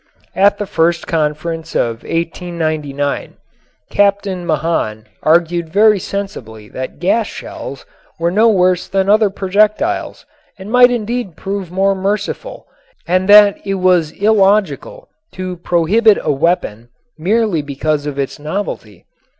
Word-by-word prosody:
At 200 Hz, +1 st, +3 dB
the 205 Hz, -, -3 dB
First 170 Hz, -2 st, 0 dB
Conference 160 Hz, +1 st, -3 dB
of 115 Hz, -1 st, -1 dB
1899 155 Hz, -4 st, -3 dB, 0.6 s
Captain 200 Hz, -3 st, 0 dB
Mahan 150 Hz, -9 st, -1 dB, 0.2 s
argued 170 Hz, +1 st, +1 dB
very 210 Hz, +3 st, +4 dB
sensibly 115 Hz, -, -6 dB
that 130 Hz, 0 st, -6 dB
gas 215 Hz, +5 st, +1 dB
shells 135 Hz, -, -8 dB, 0.3 s
were 170 Hz, +1 st, 0 dB
no 220 Hz, +5 st, +4 dB
worse 185 Hz, -3 st, +2 dB
than 195 Hz, 0 st, 0 dB
other 215 Hz, 0 st, +4 dB
projectiles 210 Hz, -, 0 dB, 0.3 s
and 195 Hz, +2 st, -9 dB
might 250 Hz, 0 st, +6 dB
indeed 235 Hz, -5 st, -3 dB
prove 195 Hz, -2 st, -4 dB
more 195 Hz, +2 st, +2 dB
merciful 205 Hz, -, -3 dB, 0.4 s
and 185 Hz, +2 st, +1 dB
that 205 Hz, -1 st, +7 dB
it 195 Hz, -1 st, -2 dB
was 180 Hz, -4 st, +2 dB
illogical 210 Hz, -, +1 dB, 0.3 s
to 185 Hz, -1 st, -5 dB
prohibit 190 Hz, +6 st, +3 dB
a -, -, +1 dB
weapon 135 Hz, -7 st, -1 dB, 0.3 s
merely 195 Hz, 0 st, 0 dB
because 145 Hz, +1 st, -2 dB
of 145 Hz, -2 st, -5 dB
its 140 Hz, 0 st, -3 dB
novelty. 150 Hz, -, -5 dB
185 Hz, 125 wpm, -16 LUFS, 155-205 Hz, 0.6 s, that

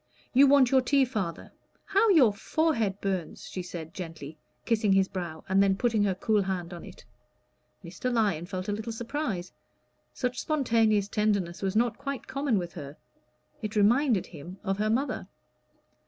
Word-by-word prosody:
"You 275 Hz, +2 st, +7 dB
want 270 Hz, -3 st, +5 dB
your 265 Hz, -1 st, +5 dB
tea, 275 Hz, +1 st, +3 dB
father; 200 Hz, -9 st, -4 dB, 0.3 s
how 400 Hz, +3 st, +3 dB
your 275 Hz, -, +6 dB
forehead 225 Hz, -, 0 dB
burns!" 190 Hz, -4 st, -3 dB
she 185 Hz, -, -5 dB
said 170 Hz, -2 st, -8 dB
gently, 160 Hz, -4 st, -8 dB, 0.3 s
kissing 215 Hz, -4 st, +2 dB
his 190 Hz, 0 st, +4 dB
brow, 170 Hz, -5 st, -6 dB
and 190 Hz, +1 st, +3 dB
then 195 Hz, -1 st, +3 dB
putting 225 Hz, -2 st, +2 dB
her 190 Hz, -2 st, 0 dB
cool 210 Hz, +2 st, +1 dB
hand 185 Hz, -2 st, -3 dB
on 170 Hz, -, -8 dB
it. -, -, -13 dB, 0.8 s
Mr. 185 Hz, +9 st, -3 dB
Lyon 205 Hz, -8 st, +1 dB
felt 185 Hz, 0 st, -5 dB
a -, -, 0 dB
little 220 Hz, +3 st, -4 dB
surprise; 225 Hz, -, -4 dB, 0.6 s
such 250 Hz, -1 st, -3 dB
spontaneous 225 Hz, -8 st, +2 dB
tenderness 205 Hz, -5 st, 0 dB
was 195 Hz, 0 st, -1 dB
not 235 Hz, 0 st, +1 dB
quite 275 Hz, -2 st, -5 dB
common 275 Hz, -5 st, 0 dB
with 175 Hz, -2 st, -4 dB
her; 145 Hz, -3 st, -8 dB, 0.6 s
it 215 Hz, -1 st, -4 dB
reminded 225 Hz, +1 st, +3 dB
him 170 Hz, +3 st, -10 dB
of 195 Hz, -1 st, -1 dB
her 215 Hz, +1 st, +1 dB
mother. 260 Hz, +6 st, -1 dB
210 Hz, 165 wpm, -28 LUFS, 185-245 Hz, 0.8 s, You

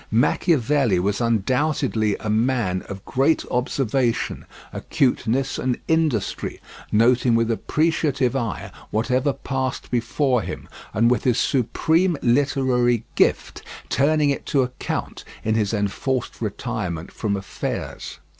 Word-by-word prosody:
Machiavelli 125 Hz, -, +2 dB
was 100 Hz, +5 st, 0 dB
undoubtedly 115 Hz, -1 st, +1 dB
a -, -, -6 dB
man 110 Hz, -4 st, +1 dB
of 100 Hz, -1 st, -7 dB
great 140 Hz, +5 st, +2 dB
observation, 125 Hz, -1 st, 0 dB, 0.3 s
acuteness, 130 Hz, 0 st, 0 dB
and 125 Hz, -1 st, 0 dB
industry; 160 Hz, -10 st, 0 dB, 0.3 s
noting 120 Hz, +2 st, +4 dB
with 115 Hz, 0 st, +2 dB
appreciative 145 Hz, 0 st, 0 dB
eye 115 Hz, -6 st, -3 dB, 0.2 s
whatever 125 Hz, +6 st, +1 dB
passed 130 Hz, -1 st, -3 dB
before 125 Hz, +1 st, +1 dB
him, -, -, -6 dB, 0.2 s
and 115 Hz, +4 st, +3 dB
with 125 Hz, -, +1 dB
his 125 Hz, -2 st, +2 dB
supreme 160 Hz, +8 st, +2 dB
literary 125 Hz, -2 st, +2 dB
gift -, -, +1 dB, 0.3 s
turning 150 Hz, +1 st, +3 dB
it 140 Hz, -, -4 dB
to 135 Hz, -2 st, +2 dB
account 125 Hz, 0 st, -4 dB, 0.2 s
in 110 Hz, -, +1 dB
his 105 Hz, -2 st, +1 dB
enforced 115 Hz, +6 st, -2 dB
retirement 105 Hz, -6 st, -4 dB
from 105 Hz, -3 st, -2 dB
affairs. 95 Hz, -, -5 dB
125 Hz, 115 wpm, -23 LUFS, 110-135 Hz, 0.3 s, noting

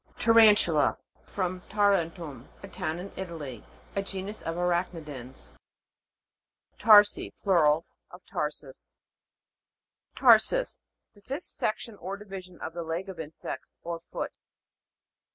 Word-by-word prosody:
TAREN'TULA. 215 Hz, -9 st, +5 dB, 0.3 s
From 185 Hz, -1 st, -3 dB
Tarentum, 170 Hz, -, 0 dB
a -, -, -6 dB
town 160 Hz, -3 st, -3 dB
in 185 Hz, +3 st, -7 dB
Italy. 160 Hz, -, -6 dB, 0.3 s
A 200 Hz, -, +1 dB
genus 195 Hz, +2 st, -6 dB
of 165 Hz, -, -3 dB
arach' 175 Hz, 0 st, +1 dB
nidans. 135 Hz, -6 st, -9 dB, 1.3 s
TAR'SI. 210 Hz, -1 st, +6 dB
Plural 160 Hz, -5 st, +4 dB, 0.2 s
of -, -, -13 dB
tarsus. -, -, -5 dB, 1.2 s
TAR'SUS. -, -, +4 dB, 0.3 s
The 205 Hz, -, -20 dB
fifth 270 Hz, +8 st, -5 dB
section 215 Hz, 0 st, -3 dB
or 195 Hz, +2 st, -5 dB
divi 195 Hz, -2 st, -8 dB
sion 180 Hz, -1 st, -16 dB
of 160 Hz, -, -5 dB
the 170 Hz, -, -4 dB
leg 170 Hz, +4 st, -4 dB
of 185 Hz, -3 st, -8 dB
insects, 155 Hz, 0 st, -7 dB
or 170 Hz, 0 st, -4 dB
foot. -, -, -3 dB
180 Hz, 115 wpm, -28 LUFS, 165-205 Hz, 1.3 s, TAR'SI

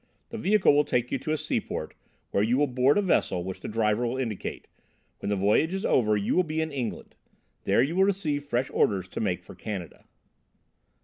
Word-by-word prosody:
The 230 Hz, -, -6 dB
vehicle 210 Hz, -5 st, +4 dB
will 145 Hz, +1 st, +4 dB
take 125 Hz, -3 st, -1 dB
you 135 Hz, -, 0 dB
to 155 Hz, -, -3 dB
a 155 Hz, -, +1 dB
seaport, -, -, -3 dB, 0.4 s
where 100 Hz, -, +2 dB
you 115 Hz, +4 st, +2 dB
will 145 Hz, -, +4 dB
board 130 Hz, +3 st, +2 dB
a 205 Hz, -, +2 dB
vessel 95 Hz, -, +1 dB
which 95 Hz, +1 st, -6 dB
the -, -, -7 dB
driver 110 Hz, +1 st, +1 dB
will 125 Hz, +3 st, -2 dB
indicate; 115 Hz, -7 st, -4 dB, 0.5 s
when -, -, -4 dB
the 105 Hz, -, +1 dB
voyage 105 Hz, -, +2 dB
is 195 Hz, -, -3 dB
over 110 Hz, -3 st, +3 dB
you 100 Hz, -, 0 dB
will 185 Hz, -, +5 dB
be 160 Hz, -2 st, -3 dB
in 160 Hz, 0 st, -1 dB
England: 130 Hz, -5 st, -5 dB, 0.5 s
there -, -, +4 dB
you 155 Hz, +6 st, -2 dB
will 190 Hz, +1 st, +5 dB
receive 165 Hz, -8 st, -1 dB
fresh 130 Hz, -2 st, -1 dB
orders 95 Hz, -3 st, +1 dB
to -, -, -5 dB
make 95 Hz, -5 st, -1 dB
for -, -, -12 dB
Canada." 95 Hz, -5 st, -7 dB
125 Hz, 210 wpm, -27 LUFS, 105-155 Hz, 0.5 s, will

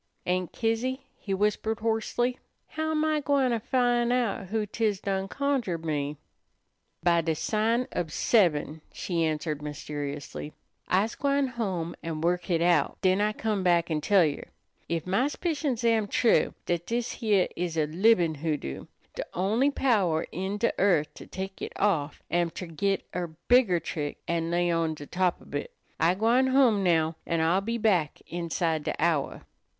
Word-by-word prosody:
"Aunt 180 Hz, -1 st, -1 dB
Kizzy," 250 Hz, +4 st, -1 dB
he 200 Hz, -, -6 dB
whispered 210 Hz, +2 st, 0 dB
hoarsely, 230 Hz, +3 st, 0 dB, 0.3 s
"how 315 Hz, 0 st, -2 dB
am 310 Hz, 0 st, +1 dB
I 310 Hz, -1 st, +2 dB
gwine 280 Hz, -3 st, +2 dB
to 230 Hz, -, +1 dB
fin' 240 Hz, 0 st, +1 dB
out 235 Hz, -6 st, 0 dB
who 215 Hz, +2 st, -1 dB
't 220 Hz, +3 st, -5 dB
is 210 Hz, -3 st, +2 dB
done 195 Hz, -1 st, -2 dB
conjured 245 Hz, -, -1 dB
me?" 145 Hz, -1 st, -2 dB, 0.9 s
"By 170 Hz, -1 st, +4 dB
de 160 Hz, -1 st, -1 dB
sign 225 Hz, -, 0 dB
ob 175 Hz, -3 st, -1 dB
seben," 160 Hz, -5 st, +2 dB
she 170 Hz, -3 st, -2 dB
answered 155 Hz, -1 st, -1 dB
mysteriously. 145 Hz, 0 st, -6 dB, 0.3 s
"I's 200 Hz, +5 st, +2 dB
gwine 280 Hz, -1 st, +1 dB
home 190 Hz, -9 st, -3 dB
an' 165 Hz, -2 st, -4 dB
work 175 Hz, +1 st, +1 dB
hit 170 Hz, -2 st, +1 dB
out, 170 Hz, -5 st, +2 dB
den 185 Hz, +1 st, +3 dB
I 210 Hz, +1 st, +2 dB
come 215 Hz, -2 st, -1 dB
back 175 Hz, -2 st, +2 dB
an' 155 Hz, -1 st, 0 dB
tell 195 Hz, 0 st, +4 dB
yer. 145 Hz, -2 st, -3 dB, 0.4 s
Ef 165 Hz, -1 st, -1 dB
my 195 Hz, +9 st, +2 dB
'spicions 290 Hz, -6 st, -2 dB
am 225 Hz, -3 st, +3 dB
true, 235 Hz, +3 st, +2 dB
dat 175 Hz, -1 st, -1 dB
dis 235 Hz, 0 st, -1 dB
heah 205 Hz, -5 st, +3 dB
is 170 Hz, -1 st, -3 dB
a 155 Hz, -, +3 dB
libin' 175 Hz, +1 st, +3 dB
hoodoo, 145 Hz, -, -3 dB, 0.3 s
de -, -, -4 dB
only 215 Hz, +10 st, +2 dB
power 205 Hz, -, +1 dB
in 190 Hz, +4 st, -3 dB
de 230 Hz, +3 st, +1 dB
earth 175 Hz, -7 st, +2 dB
to -, -, -11 dB
tek 190 Hz, +1 st, -6 dB
it -, -, -5 dB
off 155 Hz, -8 st, 0 dB
am 175 Hz, 0 st, +2 dB
ter 180 Hz, -, -7 dB
git 190 Hz, +4 st, -1 dB
er 175 Hz, -3 st, -3 dB
bigger 240 Hz, -8 st, +5 dB
trick 150 Hz, -2 st, -4 dB
an' 165 Hz, -1 st, -1 dB
lay 175 Hz, 0 st, +1 dB
on 165 Hz, -1 st, 0 dB
de 145 Hz, -, -9 dB
top 180 Hz, +2 st, 0 dB
ob -, -, -16 dB
hit. -, -, -3 dB, 0.3 s
I'm 175 Hz, +3 st, +3 dB
gwine 235 Hz, +5 st, +3 dB
home 260 Hz, -6 st, +4 dB
now, 160 Hz, -2 st, +2 dB
an' 165 Hz, -1 st, +1 dB
I'll 170 Hz, +4 st, +3 dB
be 230 Hz, +4 st, -2 dB
back 190 Hz, -9 st, +1 dB
inside 165 Hz, -1 st, -1 dB
de -, -, -2 dB
hour." 160 Hz, -3 st, 0 dB
185 Hz, 175 wpm, -27 LUFS, 165-230 Hz, 0.9 s, bigger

